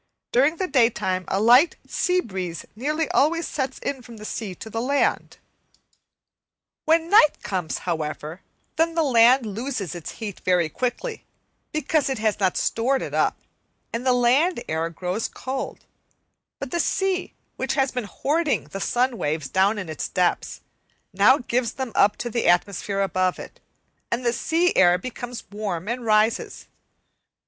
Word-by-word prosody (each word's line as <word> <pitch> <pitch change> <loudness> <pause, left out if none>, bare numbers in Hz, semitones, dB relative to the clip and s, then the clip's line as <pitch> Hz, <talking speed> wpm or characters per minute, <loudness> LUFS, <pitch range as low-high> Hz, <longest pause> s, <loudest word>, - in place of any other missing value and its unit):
During 280 +6 +3
the 375 - -2
daytime 230 - +1
a 195 - 0
light 245 +9 +6
sea 365 -1 +1
breeze 185 - -5
nearly 300 +7 -1
always 330 +4 +2
sets 265 -2 -3
in 270 -2 -4
from 235 -2 -12
the 215 - -9
sea 210 -4 -5
to 220 - -10
the 225 +1 -3
land. 280 +3 0 1.5
When 325 +1 +2
night 360 -8 +5
comes, 180 -5 -2
however, 160 0 -4 0.4
then 330 +1 +2
the 330 - +3
land 250 -1 +5
loses 215 - -4
its 175 -3 -7
heat 210 -4 -7
very 180 -3 +1
quickly, 250 - -3 0.5
because 305 -1 0
it 265 - -1
has 215 -1 0
not 190 -2 +1
stored 260 +4 +1
it - - -6
up - - +1 0.6
and 230 +2 -2
the 255 - +3
land 250 +5 +3
air 160 +1 -1
grows 180 +5 -3
cold; 265 +1 -6 0.7
but 275 -2 -6
the 345 - -1
sea, 385 +1 0 0.2
which - - -2
has 270 -2 +1
been 250 -3 -3
hoarding 295 - -1
the 195 - -5
sun 245 +2 0
waves 150 -1 -2
down 195 +3 +2
in 185 -4 -5
its 155 -1 -4
depths, 180 -2 0 0.5
now 205 +8 +5
gives 245 -3 -1
them 260 -3 -4
up 205 +1 +4
to 240 - -4
the 235 - 0
atmosphere 195 +3 +1
above 185 -2 0
it, - - -10 0.5
and 240 +1 -1
the 235 - +2
sea 335 +8 +1
air 175 -1 +5
becomes 245 +3 -7
warm 200 -4 -4
and 240 +1 -3
rises. 215 +1 +1
235 Hz, 160 wpm, -24 LUFS, 190-275 Hz, 1.5 s, light